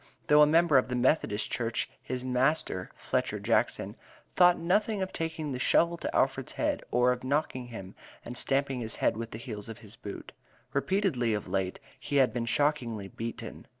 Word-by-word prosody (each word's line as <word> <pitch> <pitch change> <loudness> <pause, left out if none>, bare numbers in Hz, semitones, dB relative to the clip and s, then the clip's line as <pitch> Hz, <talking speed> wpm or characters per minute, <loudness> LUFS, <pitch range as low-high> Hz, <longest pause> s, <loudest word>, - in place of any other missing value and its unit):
Though 150 +5 +6
a 150 - +8
member 160 -2 +5
of 125 - -2
the 125 - -2
Methodist 125 -4 +1
Church, 115 -1 -1
his 125 0 -4
master, 125 -7 0
Fletcher - - -1
Jackson, - - 0 0.4
"thought 180 -1 +6
nothing 200 +4 +1
of 190 - -6
taking 160 -2 -3
the 125 - -3
shovel 170 +5 +3
to - - -4
Alfred's - - +1
head; - - -1
or 125 +1 +3
of 125 0 -3
knocking 130 -2 -1
him, 95 -6 -8 0.3
and 120 - -6
stamping 135 0 0
his 115 -2 -3
head - - +1
with 115 +1 -5
the 110 - -7
heels 110 -3 -7
of 115 - -7
his 110 -1 -14
boots." 100 - -8 0.4
Repeatedly, 140 - +1
of 105 - -5
late, 95 -1 -2 0.2
he 145 - -4
had 135 -2 +4
been 120 -1 -2
shockingly 115 -7 0
beaten. 115 +3 -7
125 Hz, 185 wpm, -29 LUFS, 115-150 Hz, 0.4 s, a